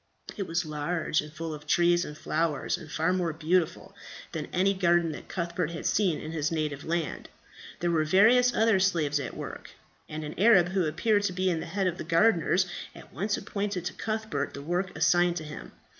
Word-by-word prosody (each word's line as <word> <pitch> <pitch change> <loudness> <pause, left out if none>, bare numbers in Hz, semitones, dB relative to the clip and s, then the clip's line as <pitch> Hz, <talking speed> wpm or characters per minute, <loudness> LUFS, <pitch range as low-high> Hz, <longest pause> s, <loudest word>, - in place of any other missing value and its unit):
It 195 -3 -4
was 170 +1 -1
large, 155 +1 -1
and 150 0 -10
full 160 0 -5
of 150 0 -10
trees 175 +2 +3
and 150 - -8
flowers, 155 -2 -1
and 160 -4 -10
far 165 +3 +1
more 180 -3 0
beautiful 165 +2 0 0.4
than - - -4
any 190 +2 +2
garden 175 -3 +2
that - - -9
Cuthbert 170 -2 -2
had 170 0 -6
seen 185 -7 +2
in 155 - -6
his 155 -1 -1
native 150 -3 -2
land. 165 -1 -3 0.5
There 175 0 +1
were 160 -2 +2
various 225 +10 +5
other 225 -4 +3
slaves 165 -7 +1
at 140 - -6
work; - - -7 0.4
and 155 0 -5
an 150 - -5
Arab, 195 -4 +6
who 190 -1 +1
appeared 205 +7 +1
to 185 - -1
be 185 0 +1
the 160 - -4
head 195 -1 -1
of 180 -1 -1
the - - -3
gardeners, 175 +1 +3 0.3
at - - -14
once 205 +2 -1
appointed 200 -3 -3
to - - -3
Cuthbert 215 -10 -3
the 140 - -7
work 180 +4 -1
assigned 175 0 +3
to 160 - -4
him. 155 0 -9
175 Hz, 200 wpm, -28 LUFS, 155-190 Hz, 0.5 s, Arab